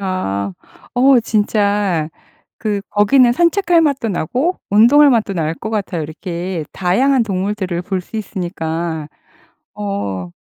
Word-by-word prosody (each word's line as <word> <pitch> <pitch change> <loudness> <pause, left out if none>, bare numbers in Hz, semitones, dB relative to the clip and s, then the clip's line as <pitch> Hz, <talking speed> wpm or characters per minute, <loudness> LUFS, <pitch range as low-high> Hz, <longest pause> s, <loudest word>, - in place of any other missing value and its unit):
어아. 100 - -2 0.4
어 255 0 +5
진짜 205 -6 0 0.5
그 210 -3 -2
거기는 240 +4 +4
산책할 345 +3 +3
맛도 280 -7 0
나고 255 - -1
운동할 265 +8 +6
맛도 220 -4 +1
날 165 -3 -1
것 220 - -6
같아요 195 -6 -2
이렇게 170 +2 -5
다양한 245 +8 +2
동물들을 190 -3 -2
볼 190 0 -2
수 200 +5 -9
있으니까. 170 -5 -4 0.7
어 100 -3 -4
200 Hz, 250 characters per minute, -17 LUFS, 170-235 Hz, 0.7 s, 운동할